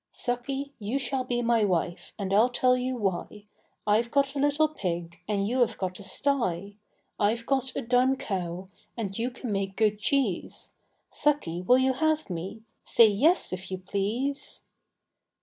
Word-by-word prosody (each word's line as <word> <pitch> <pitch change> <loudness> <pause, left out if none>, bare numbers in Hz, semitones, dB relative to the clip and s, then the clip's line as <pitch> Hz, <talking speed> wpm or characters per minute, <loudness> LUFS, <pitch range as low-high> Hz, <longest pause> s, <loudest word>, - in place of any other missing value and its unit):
Sucky, 270 +3 -3
you 215 +5 -1
shall 265 -1 -1
be 245 -1 -1
my 230 -2 +3
wife, 175 -3 -1
And 195 -2 -3
Iâll 220 +5 +4
tell 250 +1 +3
you 255 0 -2
why; 205 0 -3 0.4
I 210 0 +4
have 235 +1 -1
got 275 +1 +2
a 285 - -3
little 290 +2 +3
pig, 170 - -4
And 200 -1 0
you 250 +4 0
have 245 - +2
got 185 0 -3
a - - -8
sty; 200 - -1 0.4
I 205 - +4
have 230 +1 -3
got 265 -1 0
a - - -2
dun 250 +3 +3
cow, 185 -5 -4 0.3
And 200 -4 -3
you 240 +2 0
can 245 -2 -6
make 195 -1 -2
good 215 -2 +2
cheese, 245 -6 -1 0.4
Sucky, 280 - 0
will 250 +7 +5
you 260 0 +3
have 310 -4 0
me? 185 +6 -5 0.2
Say 230 -2 +6
yes, 280 - +3
if 185 0 -5
you 190 - -3
please. 210 +9 -3
230 Hz, 175 wpm, -27 LUFS, 195-260 Hz, 0.4 s, Say